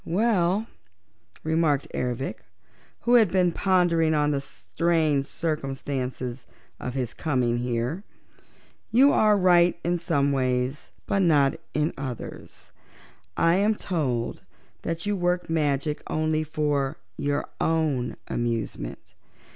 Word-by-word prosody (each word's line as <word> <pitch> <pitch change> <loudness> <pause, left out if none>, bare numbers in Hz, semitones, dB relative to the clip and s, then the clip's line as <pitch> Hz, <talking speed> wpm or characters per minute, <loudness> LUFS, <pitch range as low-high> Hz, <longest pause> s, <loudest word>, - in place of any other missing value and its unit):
"Well," 200 0 +1 0.8
remarked 160 -3 +1
Ervic, 125 +1 -2 0.6
who 240 - +2
had 225 -5 +6
been 180 -2 +3
pondering 170 -4 +2
on 150 0 +2
the 140 -1 0
strange 155 -1 0
circumstances 135 -5 -3 0.3
of 125 0 -5
his 125 -3 -2
coming 125 -6 0
here, 125 - -2 0.9
"you 265 +5 +6
are 210 -1 +4
right 175 -2 +4
in 175 +1 0
some 145 -4 +1
ways, 130 +1 -1 0.2
but 200 - 0
not 145 -6 +4 0.2
in 150 +2 +1
others. 130 -4 -7 0.7
I 165 +2 +4
am 210 +2 +3
told 135 - -2 0.4
that 165 +2 -3
you 205 0 0
work 175 -2 0
magic 150 -1 0
only 155 0 0
for 145 -3 -1 0.2
your 145 0 -1
own 150 -7 0
amusement. 115 - -3
155 Hz, 115 wpm, -26 LUFS, 135-175 Hz, 0.9 s, had